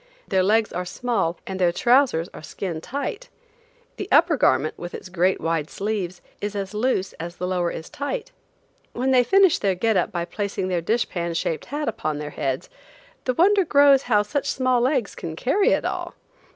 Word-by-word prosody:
Their 190 -2 +2
legs 215 +3 +2
are 180 - -2
small 185 -3 -1
and 190 0 -5
their 175 -2 +3
trousers 240 - +3
are - - -9
skin 165 0 -5
tight. 285 - -5 0.7
The 395 - -4
upper 325 +2 +5
garment, 155 - +2
with 175 0 -7
its 185 - -9
great 185 +1 +1
wide 165 -2 -1
sleeves, 195 -4 -3 0.2
is 205 0 -3
as 195 0 -4
loose 210 -3 0
as 170 +1 -6
the 180 - -4
lower 180 -1 0
is 160 - -6
tight. 450 - -4 0.6
When 260 +2 0
they 255 -1 +5
finish 385 +5 +4
their 195 -2 +1
"get 220 +2 +1
up" 180 - 0
by 170 -1 -2
placing 200 0 -3
their 175 -2 0
dish 225 +7 0
pan 170 -1 -3
shaped 165 -1 -2
hat 295 +2 -4
upon 155 -8 -2
their 150 0 -5
heads, 135 -3 -2 0.6
the 255 - 0
wonder 390 +5 +4
grows 285 -4 +5
how 210 -3 +4
such 280 +7 -2
small 255 -2 +1
legs 255 -4 +1
can 160 -1 -6
carry 320 - +2
it - - +1
all! - - -3
200 Hz, 190 wpm, -23 LUFS, 175-260 Hz, 0.7 s, upper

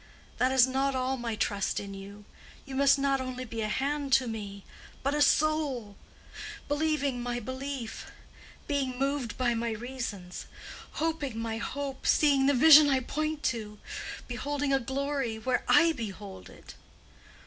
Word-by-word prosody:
"That 255 +1 +3
is 260 -2 +6
not 265 +1 0
all 260 +1 0
my 235 -3 -3
trust 200 -2 0
in 200 -1 -7
you. 200 +1 -10 0.4
You 275 - -9
must 275 +1 +5
be 275 - -3
not 275 -1 +2
only 255 0 -5 0.2
a 215 - 0
hand 280 +4 -1
to 265 -1 +5
me, 200 -3 -6 0.4
but 275 +1 +1
a 295 - +1
soul—believing 290 0 -1
my 240 0 -2
belief—being 260 +1 -5
moved 275 -2 -1
by 245 -2 +2
my 230 0 -1
reasons—hoping 240 - -5
my 225 0 -2
hope—seeing 275 +1 +1
the 285 - +4
vision 300 +2 +9
I 265 -1 +3
point 305 +3 -3
to—beholding 245 +5 -3
a 270 - +4
glory 270 -2 -2
where 250 +3 0
I 335 -1 +6
behold 205 -7 -7
it!" - - -13
260 Hz, 135 wpm, -29 LUFS, 230-280 Hz, 0.4 s, vision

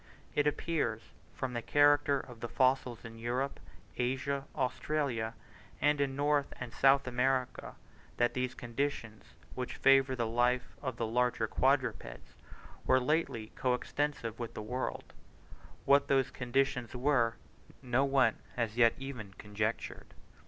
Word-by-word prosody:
It 145 0 +2
appears 145 -7 -1 0.3
from 130 -2 -3
the 120 - -2
character 145 +1 +4
of 125 -3 -11
the 120 - -4
fossils 130 -1 +1
in 115 0 -9
Europe, 125 +4 -2 0.4
Asia, 135 +2 -1
Australia, 130 -4 -1 0.4
and 145 -1 +2
in 135 -1 0
North 145 0 +1
and 125 -2 -6
South 135 +1 +4
America, 130 +1 -1 0.4
that 120 0 +2
those 125 0 -2
conditions 120 -3 -3 0.3
which 125 0 -4
favour 135 -1 +4
the 120 -2 -1
life 120 +2 +1
of 130 -4 -4
the 115 - -1
larger 125 +2 +1
quadrupeds - - 0 0.5
were 130 - +4
lately 125 -6 -1
co 125 -1 +1
extensive 125 -4 -3
with 120 -2 -5
the 110 - -5
world: 125 +4 -4 0.7
what 140 0 +5
those 135 -1 +2
conditions 125 -1 -1
were, 125 -3 +2 0.5
no 125 +1 +2
one 135 -5 +3 0.2
has 115 -2 -2
yet 115 -2 +5
even 125 -8 -7
conjectured. 105 +2 -4
125 Hz, 135 wpm, -32 LUFS, 120-140 Hz, 0.7 s, what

